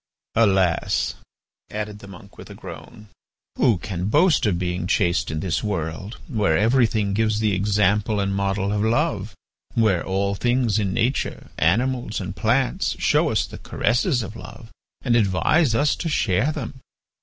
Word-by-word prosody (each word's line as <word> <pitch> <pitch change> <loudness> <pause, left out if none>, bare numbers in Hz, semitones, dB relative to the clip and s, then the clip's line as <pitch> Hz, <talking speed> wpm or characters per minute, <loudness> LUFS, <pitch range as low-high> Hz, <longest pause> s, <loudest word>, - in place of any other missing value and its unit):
"Alas!" 95 -6 +2 0.6
added 105 -1 -5
the 100 - -12
monk, 100 +1 -13
with - - -11
a - - -10
groan, 105 -1 -11 0.5
"who 115 -6 +4
can 90 -2 -4
boast 150 - +3
of 95 -4 +1
being 90 0 -2
chaste 85 -1 +1
in 80 0 -3
this 90 -3 -1
world, 95 +1 -4
where 105 - +1
everything 110 -2 +2
gives 110 0 +1
the 110 -2 +1
example 105 +2 +1
and 100 0 0
model 100 0 -1
of 105 - 0
love, 110 - 0 0.4
where 105 -7 +2
all 100 +1 -1
things 120 0 +1
in 100 -3 -1
nature, 125 +8 -1
animals, 120 +6 +1
and 95 -1 -5
plants, 120 +8 0
show - - +2
us - - +1
the - - -10
caresses 120 - 0
of 110 +2 -8
love 115 0 -11 0.3
and 120 -3 +2
advise 115 - +2
us 145 +4 +2
to 165 - -3
share 120 - +1
them? 135 -3 -6
105 Hz, 155 wpm, -23 LUFS, 95-115 Hz, 0.6 s, who